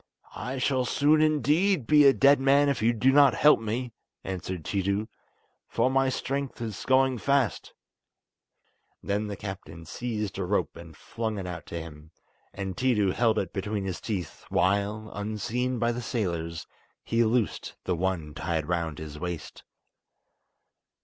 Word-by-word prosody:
"I 125 +4 -4
shall 130 0 +1
soon 150 +4 +3
indeed 155 - +2
be 150 +3 +6
a 140 - +9
dead 140 +1 +5
man 140 +2 +4
if 140 -5 -1
you 115 +2 +4
do 125 +3 +3
not 140 -2 +6
help 150 0 +5
me," 115 +2 -3 0.3
answered 90 -2 -5
Tiidu, 100 +2 -1 0.6
"for 130 - +1
my 135 0 +3
strength 135 +1 -3
is 110 -4 -5
going 130 -1 +3
fast." 140 -3 0 1.3
Then 105 +1 -1
the 100 - -4
captain 95 -5 -8
seized 105 +2 -4
a - - 0
rope - - -1
and 80 -2 -12
flung 110 -2 -4
it 95 - -4
out 90 -2 -7
to 85 - -5
him, 80 -1 -10 0.4
and 95 -2 -5
Tiidu 115 -7 +2
held 115 -2 +2
it 95 - -2
between 100 0 -3
his 95 -2 -4
teeth, 95 -8 -5
while, 100 +3 0
unseen 110 +5 -2
by 120 0 +1
the 120 +1 -4
sailors; 85 -8 -3 0.4
he 115 +1 +2
loosed 115 -1 -1
the 90 - -1
one 85 -4 -2
tied 80 -2 -2
round 85 -3 -2
his 75 -1 -8
waist. 90 -2 -6
110 Hz, 155 wpm, -27 LUFS, 95-130 Hz, 1.3 s, a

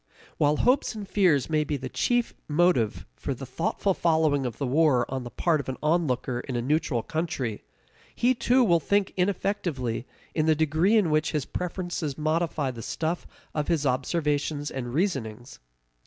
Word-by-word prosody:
While 150 0 +3
hopes 250 -2 +2
and 205 -2 -6
fears 180 -10 +3
may 155 -1 +1
be 150 -1 -2
the 130 -1 -5
chief 240 - 0
motive 150 -8 +2
for - - -8
a - - -8
thoughtful 140 +9 -1
following 160 -6 +2
of 115 -2 -6
the 140 - -2
war 135 -2 +3
on 130 -1 -2
the 120 - -6
part 160 +4 +1
of 135 - -5
an 130 - -4
onlooker 145 -6 +1
in 125 0 -5
a 120 - 0
neutral 145 -4 0
country, 150 -9 -3 0.5
he 250 +2 +3
too 250 +1 +3
will 170 -7 +4
think 200 +5 +1
ineffectively 180 - -1 0.3
in 155 -1 +1
the 160 - +5
degree 160 +8 +3
in 185 -7 +2
which 155 +1 +1
his 150 -3 0
preferences 175 -5 -3
modify 155 -2 0
the 115 -2 -8
stuff 165 +8 -3 0.3
of 150 -1 -1
his 160 -4 +1
observations 145 +2 0
and 120 -1 -5
reasonings. 130 - -2
155 Hz, 170 wpm, -26 LUFS, 130-175 Hz, 0.5 s, the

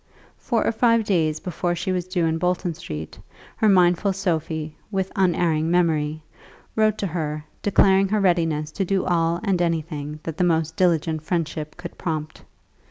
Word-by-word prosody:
Four 235 -3 0
or - - +2
five 230 0 +3
days 160 -7 +1
before 175 0 -2
she 185 +2 -2
was 180 -1 -2
due 180 -2 0
in 160 0 0
Bolton 180 0 0
Street, 80 - -7 0.4
her 215 - +3
mindful 180 +1 +4
Sophie, 160 -4 -2
with 190 -2 -2
unerring 170 -4 +2
memory, 155 -3 +1 0.5
wrote 215 -1 +3
to 205 - -2
her, 155 -4 -3 0.2
declaring 195 -1 +4
her 215 +2 +1
readiness 165 -5 +1
to 195 - -2
do 195 +1 0
all 170 -1 +1
and 195 -4 +1
anything 155 -3 -2
that 165 -1 -5
the - - +2
most 160 -2 +1
diligent 165 -3 +1
friendship 155 -2 -3
could 175 - -9
prompt. 155 -3 -4
170 Hz, 165 wpm, -23 LUFS, 155-190 Hz, 0.5 s, mindful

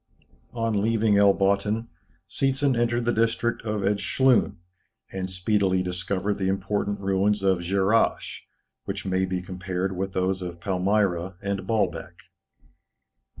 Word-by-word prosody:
On 115 -3 0
leaving 110 -1 +2
El 100 -1 +6
Botthin, 100 +3 0 0.4
Seetzen 135 0 +1
entered 120 0 0
the 120 - +2
district 115 +1 0
of 105 -2 -3
Edschlun, 115 +6 +2 0.6
and 95 -1 -4
speedily 95 0 +1
discovered 90 +3 -2
the 95 - 0
important 100 +1 -1
ruins 100 +1 +1
of 95 -2 +3
Dscherrasch, 95 +5 +1 0.5
which - - -5
may 95 0 +1
be 90 -1 -3
compared 95 +1 -3
with 95 +1 -3
those 95 0 0
of 85 -1 -6
Palmyra 95 -1 0
and 100 -1 -4
Baalbek. 110 -2 -1
100 Hz, 125 wpm, -25 LUFS, 95-110 Hz, 0.6 s, El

